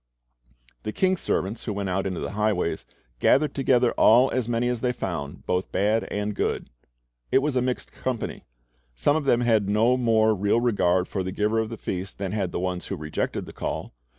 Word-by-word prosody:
The 110 - -4
king's 185 - +1
servants 100 +5 -2
who 105 - -2
went 100 -1 -3
out 95 +1 0
into 95 -3 -3
the - - -4
highways 105 -4 -1 0.3
"gathered 150 - +3
together 125 -3 +3
all 125 +4 +5
as 125 -2 -1
many 120 +1 +1
as 125 -2 -1
they 125 - +1
found, 75 -10 -5
both 90 +1 -1
bad 105 +4 +1
and 105 +1 -3
good." - - -2 0.6
It - - +5
was 150 -2 0
a 125 - +3
mixed 125 0 -2
company. 125 -3 -4 0.5
Some 100 - +2
of 155 -2 -1
them 120 -3 +3
had 110 -4 +2
no 115 +5 +3
more 110 -3 +3
real 105 +3 +2
regard 95 -6 +2
for 95 - -3
the 95 0 -3
giver 105 +3 +1
of 110 -1 -1
the 115 - -6
feast 95 0 -5
than 95 -2 -3
had 95 -4 -1
the - - -3
ones 90 0 -3
who - - -3
rejected 75 0 -3
the - - -11
call. - - -4
110 Hz, 205 wpm, -25 LUFS, 95-120 Hz, 0.6 s, all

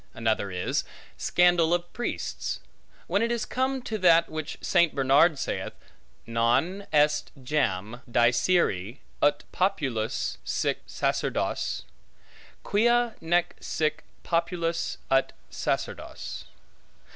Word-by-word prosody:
Another 110 -3 0
is, 90 -1 -1 0.3
scandal 175 -1 +3
of 175 0 -5
priests; 240 - -3 0.5
when - - +1
it 230 +1 +1
is 235 -2 -1
come 260 0 -1
to 220 -3 -3
that 170 -2 +5
which 155 -1 -5
St. 175 -3 +2
Bernard 140 +4 +4
saith, 135 - -3 0.5
non 125 +13 +1
est 150 0 +3
jam 120 -5 -1
dicere, 120 - +2 0.2
ut 145 - +3
populus 135 - -1
sic - - -1
sacerdos; - - -1 0.8
quia 240 +2 +3
nec 175 +1 +1
sic 155 -1 -1 0.2
populus 170 0 -1
ut 135 0 +3 0.2
sacerdos. - - -4
160 Hz, 100 wpm, -27 LUFS, 125-180 Hz, 0.8 s, that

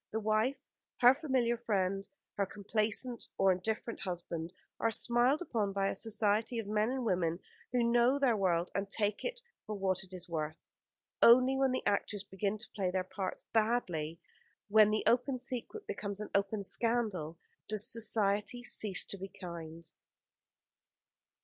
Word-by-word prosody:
The 220 - -1
wife, 220 +5 +1 0.4
her 245 +1 +9
familiar 260 -5 0
friend, 195 -4 -1 0.2
her 200 -1 -1
complaisant 215 +4 -2
or 195 -1 +5
indifferent 220 +5 -2
husband, 170 -2 -4 0.3
are 230 - +2
smiled 240 +7 +2
upon 210 - -1
by 195 0 +1
a - - -3
society 215 +2 0
of 225 - -2
men 210 +2 +1
and 260 -1 -2
women 175 -4 +1 0.3
who 245 -1 +2
know 240 +3 +4
their 265 -5 +3
world 175 -3 +1
and 195 +1 -2
take 210 0 -1
it - - -3 0.3
for 215 - -3
what 190 -1 0
it 190 - -16
is 180 -1 -7
worth. 155 -1 -3 0.6
Only 255 +3 +7
when 265 -1 +2
the 255 - -2
actors 205 0 0
begin 200 +1 -2
to 225 - -10
play 190 -3 -1
their 185 0 0
parts 185 0 -5
badly, 190 -9 0
and - - -42 0.5
when 215 0 +7
the 215 0 0
open 255 +2 +2
secret 255 - -6
becomes 200 -1 -4
an 210 - -6
open 200 +1 0
scandal, 210 -8 -1 0.3
does 210 -1 +2
Society 215 +1 +1
cease 205 -6 +1
to 200 - -5
be 195 - -5
kind. 170 -3 -8
210 Hz, 160 wpm, -33 LUFS, 190-235 Hz, 0.6 s, her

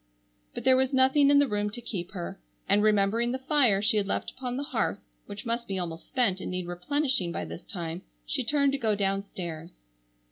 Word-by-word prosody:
But - - -4
there 260 - +6
was 265 +1 +1
nothing 265 +2 +5
in 285 - +6
the 285 0 +5
room 210 -2 -1
to 215 - -5
keep 200 -6 -5
her, 175 - -6 0.3
and 205 - +4
remembering 215 +3 +2
the 260 - -1
fire 260 -7 +3
she 220 0 +3
had 200 -2 +1
left - - -2
upon 250 -1 -5
the 280 - -2
hearth, - - -1 0.3
which 205 +2 -8
must 235 +1 -2
be 195 - -3
almost 165 -2 -5
spent 210 -7 +1
and - - -4
need 185 -1 -3
replenishing 190 - 0
by - - -4
this - - -8
time, 170 -2 -5 0.2
she - - -1
turned 280 -2 +2
to 275 - -2
go 220 -4 +1
downstairs. 195 -4 -3
210 Hz, 210 wpm, -28 LUFS, 185-260 Hz, 0.3 s, there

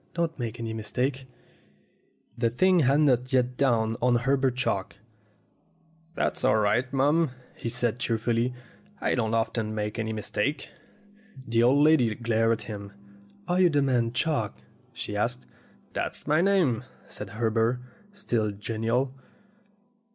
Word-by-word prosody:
Don't 165 -3 -1
make 120 -1 -4
any 115 -1 -4
mistake 125 +5 -2 0.6
!" - - -40
The 115 -1 +2
thing 185 +10 +3
had 140 0 +4
not 130 -3 +2
yet 125 -1 +2
dawned 115 -4 +1
on 125 0 +3
Herbert 135 +1 +1
Chalk. 100 -7 -1 1.2
"That's - - -1
all 105 - +4
right, 110 +5 +1
mum," 145 +4 +3 0.3
he 115 - -4
said 120 0 -1
cheerfully. 120 0 0 0.5
"I - - 0
don't 115 -2 0
often 115 -1 -1
make 105 +1 -3
any 110 0 -2
mistake." 110 +6 -2 0.8
The 115 0 +2
old 135 +5 +5
lady 135 -8 +4
glared 115 -1 +1
at 110 - -4
him. 100 -2 -7 0.5
"Are 180 +1 +2
you 180 - +6
the 145 -3 +2
man 120 -4 +1
Chalk?" 125 - -1 0.3
she - - -6
asked. 65 - -1 0.5
"That's - - -3
my 155 +2 +3
name," 175 - +2 0.2
said 105 - -8
Herbert, 115 +1 +1 0.3
still 120 - -1
genial. 115 +5 -1
120 Hz, 140 wpm, -27 LUFS, 110-135 Hz, 1.2 s, you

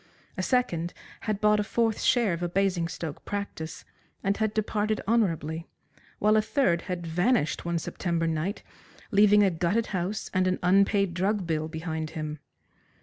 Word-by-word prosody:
A 185 - -2
second 175 -7 0 0.3
had 205 -2 0
bought 210 0 +4
a - - +2
fourth 225 0 0
share 235 -7 +3
of 170 - -4
a 175 - -1
Basingstoke 175 -4 -1
practice, 200 -6 -5 0.4
and 195 0 +1
had 220 -1 +1
departed 215 0 0
honourably, 165 -8 0 0.5
while 215 +1 +3
a 215 - +5
third 210 -6 +1
had 175 -2 -3
vanished 175 - +1
one 170 0 0
September 165 0 -2
night, 165 +5 -2 0.5
leaving 205 0 +6
a 195 - +3
gutted 180 +7 +1
house 185 +3 -2
and 185 0 +2
an 185 - +1
unpaid 195 0 +3
drug 195 +2 0
bill 155 -1 -1
behind 160 -1 -4
him. 155 -1 -4
185 Hz, 155 wpm, -27 LUFS, 165-210 Hz, 0.5 s, leaving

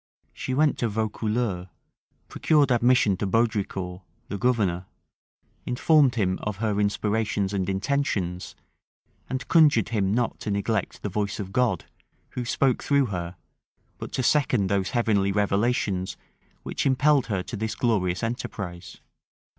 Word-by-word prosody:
She 130 - -3
went 150 0 +2
to 120 - 0
Vaucouleurs; 110 -2 -2 0.6
procured 145 -4 +2
admission 120 -4 +3
to 100 - -2
Baudricourt, 100 -4 -1 0.3
the 100 - -3
governor; 100 -8 +1 0.8
informed 135 +1 +3
him 95 -5 0
of 105 -1 -3
her 105 -1 -1
inspirations 105 -1 0
and 95 -1 -1
intentions; 95 -5 -1 0.7
and 130 0 -4
conjured 150 - +4
him 100 -4 0
not 120 +2 0
to - - -5
neglect 100 0 -2
the 105 - -2
voice 105 +2 -2
of 95 -1 -6
God, 115 -8 +1 0.4
who 125 - -5
spoke 130 +1 +1
through 140 -1 +2
her, 85 0 -4 0.6
but - - -7
to 130 - -1
second 125 -8 +2
those 100 -1 +1
heavenly 105 -6 +1
revelations 100 -1 0 0.5
which - - -2
impelled 135 +1 +3
her 95 -4 -1
to 115 - -6
this 110 +1 -3
glorious 95 -5 0
enterprise. 95 -7 -5
105 Hz, 135 wpm, -25 LUFS, 95-125 Hz, 0.8 s, conjured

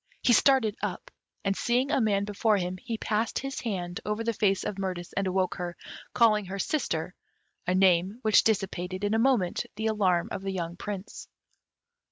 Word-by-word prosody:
He 245 - +5
started 240 -4 +4
up, - - -4 0.3
and, 195 0 +1
seeing 250 +6 +1
a - - +2
man 200 -2 +2
before 210 +1 +1
him, 180 0 -3
he 225 +4 -5
passed 220 +1 -1
his 270 0 -4
hand 180 -4 -3
over 210 +2 -2
the 230 0 0
face 195 -2 +1
of 200 - -4
Mirtis, 180 -3 -4
and 195 -1 0
awoke 185 0 +1
her, 175 -1 -5 0.3
calling 215 -3 +4
her 190 +2 -5
"sister," 185 - -1 0.5
a 180 - +2
name 185 +2 +3
which 215 -1 +5
dissipated 190 -3 -1
in 205 +1 +1
a 225 - +2
moment 230 -8 +1
the 220 +1 -3
alarm 190 -6 +2
of - - -4
the 195 - -4
young 170 -2 -3
Prince. 200 +2 -7
200 Hz, 185 wpm, -28 LUFS, 185-220 Hz, 0.5 s, He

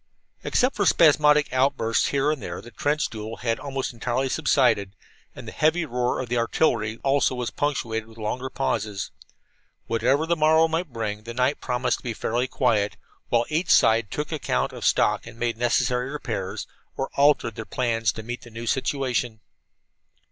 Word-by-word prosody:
Except 255 +1 +1
for 200 -3 +1
spasmodic 150 -3 +5
outbursts 130 -4 +2
here 140 +1 +1
and 155 - -3
there, - - -5
the 120 - -12
trench 145 +6 0
duel 110 0 -7
had 115 -2 -1
almost 135 -2 -4
entirely 125 +3 -1
subsided, 125 -10 +2 0.4
and - - -10
the - - -6
heavy 160 +2 +1
roar 125 -3 -1
of 130 - -3
the 120 0 0
artillery 115 -3 +1
also 135 -1 +2
was 125 -2 -3
punctuated 115 -6 -2
with 110 - -16
longer 125 +4 -3
pauses. 105 -8 -2 0.7
Whatever 125 +7 +1
the 170 +1 +1
morrow 160 +1 +4
might 165 -1 -2
bring, 105 -2 -3
the 115 +1 -8
night 125 +3 +1
promised 125 0 0
to - - -19
be 120 -2 -4
fairly 120 +4 -1
quiet, 110 -6 +1 0.3
while 120 0 +2
each 160 +4 -1
side 115 -2 +4
took 150 +2 -4
account 155 -3 -1
of - - -6
stock - - +2
and 115 0 -11
made 120 0 -1
necessary 125 +2 +1
repairs, 115 -10 -4 0.3
or 135 - -3
altered 140 -5 +3
their 115 - -6
plans 115 -1 0
to 110 - -7
meet 120 +2 -6
the 120 - -13
new 115 +1 -7
situation. 125 -3 -1
125 Hz, 175 wpm, -24 LUFS, 115-145 Hz, 0.7 s, spasmodic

